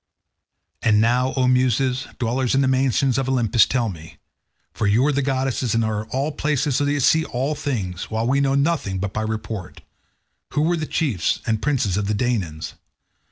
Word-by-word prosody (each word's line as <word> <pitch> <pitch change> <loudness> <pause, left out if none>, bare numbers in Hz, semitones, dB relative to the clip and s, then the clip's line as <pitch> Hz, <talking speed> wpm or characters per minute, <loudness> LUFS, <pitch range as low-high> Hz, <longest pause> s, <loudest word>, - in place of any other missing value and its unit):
And 105 -3 +3
now, 125 +4 +2
O 130 -2 +2
Muses, 130 0 +1
dwellers 125 +1 0
in 135 - +3
the 135 - +2
mansions 130 0 +2
of 135 -1 -2
Olympus, 120 -3 +3
tell 125 -3 0
me—for 85 +3 -8
you 110 +6 +3
are 150 - +3
goddesses 130 -3 0
and 115 -1 +2
are 110 0 -2
in - - -25
all 135 +6 -1
places 145 -2 0
so 145 - +1
that 145 - +1
you 145 - 0
see 160 +4 +4
all 135 +5 -2
things, 100 - -4
while 110 +1 -1
we 135 +3 +2
know 135 -1 +2
nothing 140 - 0
but 100 +1 -3
by 110 - -2
report—who 110 +5 -7
were 170 +2 +2
the 155 -1 -3
chiefs 115 - 0
and 110 -2 0
princes 125 -10 0
of 105 -1 -1
the 105 - 0
Danaans? 100 -10 -2
125 Hz, 185 wpm, -22 LUFS, 110-135 Hz, -, see